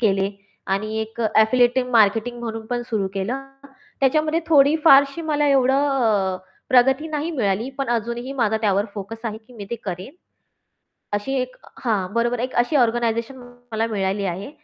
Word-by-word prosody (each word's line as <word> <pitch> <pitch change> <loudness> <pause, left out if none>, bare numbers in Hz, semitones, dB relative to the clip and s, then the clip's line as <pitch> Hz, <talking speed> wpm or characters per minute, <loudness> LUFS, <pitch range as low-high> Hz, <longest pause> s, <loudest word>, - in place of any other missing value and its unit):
केले 195 -3 +2 0.4
आणि 215 +3 -2
एक 220 +1 -6 0.2
एफिलिएटिव्ह 250 +3 +3
मार्केटिंग 225 +2 +3
म्हणून 225 -1 -5
पण 240 0 -2
सुरू 210 -3 0
केलं. 235 +8 -2 0.6
त्याच्यामध्ये 310 +4 +2
थोडी 295 -1 +5
फारशी 275 +1 +6
मला 295 -2 0
एवढं 270 +1 +3
अ, 200 -5 +1 0.3
प्रगती 265 +4 +4
नाही 310 +2 -2
मिळाली, 225 - -1
पण 275 - -2
अजूनही 235 +3 -2
माझा 225 -5 +1
त्यावर 200 -2 +2
फोकस 225 +3 -8
आहे, 220 -1 -3
की 230 +3 -21
मी 215 -4 -8
ते - - -1
करेन 185 - -6 1.0
अशी 205 +7 -2
एक 255 0 -5 0.3
हां. 200 -5 0
बरोबर 235 +1 +1
आहे. 245 - 0
एक - - -16
अशी 245 +5 +2
ऑर्गनायझेशन 235 +1 +1 0.4
मला 220 +1 0
मिळाली 200 -2 -1
आहे. 195 +9 -7
235 Hz, 160 wpm, -22 LUFS, 215-265 Hz, 1.0 s, फारशी